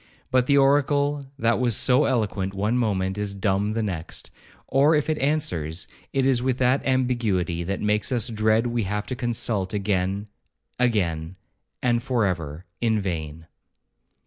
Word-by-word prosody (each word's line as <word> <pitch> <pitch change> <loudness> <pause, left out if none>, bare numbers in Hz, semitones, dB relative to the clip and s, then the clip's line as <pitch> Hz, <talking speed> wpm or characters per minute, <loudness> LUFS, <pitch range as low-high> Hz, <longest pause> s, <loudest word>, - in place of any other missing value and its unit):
but 130 -1 +3
the 140 - +4
oracle 145 0 +2
that 115 -3 +2
was 120 -3 +1
so 130 +3 +4
eloquent 100 -6 -1
one 105 +4 0
moment, 100 -5 0
is 100 -1 -2
dumb 100 +1 0
the 115 0 -1
next, 90 -6 -5 0.4
or 140 +4 +4
if 150 +1 +1
it 155 - -1
answers, 95 - -1 0.2
it 135 -1 +1
is 130 -3 +3
with 130 -1 0
that 130 +2 +2
ambiguity 115 -10 0
that 95 +3 -3
makes 105 +2 0
us 120 -4 +1
dread 110 +1 +2
we 120 -1 0
have 105 +1 -2
to 130 - -4
consult 115 -5 -1
again—again—and 95 0 -2
for 125 -3 +1
ever—in 90 +6 -2
vain. 80 -4 -4
110 Hz, 145 wpm, -24 LUFS, 95-125 Hz, 0.4 s, the